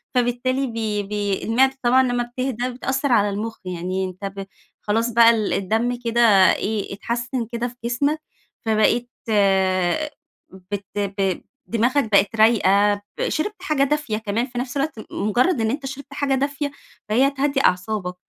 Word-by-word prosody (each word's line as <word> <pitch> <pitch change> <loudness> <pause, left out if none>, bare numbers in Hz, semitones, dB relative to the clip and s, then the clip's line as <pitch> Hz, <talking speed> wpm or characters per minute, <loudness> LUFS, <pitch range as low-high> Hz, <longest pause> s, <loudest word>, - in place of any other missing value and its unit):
فبالتالي 250 +2 +1
بي 220 -3 -2
بي 205 -1 -2
المِعدة 265 +4 +2
طبعًا 255 +2 +5
لمّا 245 -1 0
بتهدى 250 0 -3
بتأثر 265 +2 -2
على 205 -3 +4
المخ 215 +3 -4
يعني 185 +1 -3
أنت 185 +2 -7
ب 195 - -5 0.4
خلاص 225 +3 0
بقى 230 0 +6
ال 220 -3 +1
الدم 225 +5 0
كده 235 +1 +2 0.3
إيه 205 -1 -3
إتحسّن 235 +3 -3
كده 235 0 -2
في 245 - -11
جِسمك، 285 +6 0 0.4
فبقيت 225 +2 +2 1.6
بت 200 -1 -3
ب 195 -2 -1 0.3
دماغك 235 +1 +1
بقت 200 +3 +3
رايقة 205 -2 +4 0.2
ب - - -1
شِربت 415 +4 -3
حاجة 300 -5 +1
دافية 290 -6 0
كمان 220 +2 -1
في 245 -2 -10
نفس 250 +2 -3
الوقت 275 -5 -2
مـُ - - -7 0.2
مُجرد 245 - +2
إن 220 - +1
أنت 275 0 -4
شِربت 275 +1 -8
حاجة 285 -1 0
دافية 285 +1 -2 0.4
فهي 250 +6 +4
هتهدّي 275 0 0
أعصابك، 180 0 0
235 Hz, 155 wpm, -22 LUFS, 210-265 Hz, 1.6 s, بقى